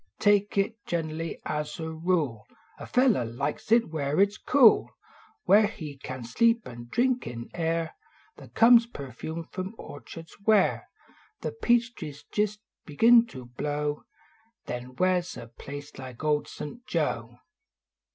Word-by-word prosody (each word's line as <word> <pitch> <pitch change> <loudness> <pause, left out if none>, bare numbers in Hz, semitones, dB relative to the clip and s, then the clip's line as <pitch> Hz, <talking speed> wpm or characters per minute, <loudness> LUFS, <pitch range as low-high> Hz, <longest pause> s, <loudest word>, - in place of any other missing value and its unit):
Take 205 -1 +2
it 225 +4 0
gener 160 -2 -2
ly, 165 +1 -4
as 150 0 -3
a 160 0 -4
rule. 160 - -1 0.3
A - - -8
feller 250 - +3
likes 140 - -4
it 230 -3 +4
where 145 0 -1
it 200 0 +6
s 205 - -12
cool. 255 -5 +5 0.5
Where 210 +1 +6
he 155 -9 -8
can 130 -2 -7
sleep, 230 - +2
an 120 -1 -9
drink 250 - +1
in 120 -1 -7
air 165 -1 -1 0.4
That - - -14
conies 235 0 +7
perfumed 160 - -7
from 190 +4 -5
orchards 165 +3 -10
where 215 -2 +3 0.5
The - - -3
peach 240 - +2
trees 145 -8 -9
jist 210 0 0 0.2
begin 230 +10 +5
to 130 - -10
blow; 145 +4 -3 0.6
Then 125 +1 -6
where 185 +2 +3
s 175 0 -5
a - - -7
place 145 +4 -9
like 130 0 -9
Old 150 -1 +1
St. 235 +12 -8
Joe? - - -2
165 Hz, 150 wpm, -27 LUFS, 145-220 Hz, 0.6 s, conies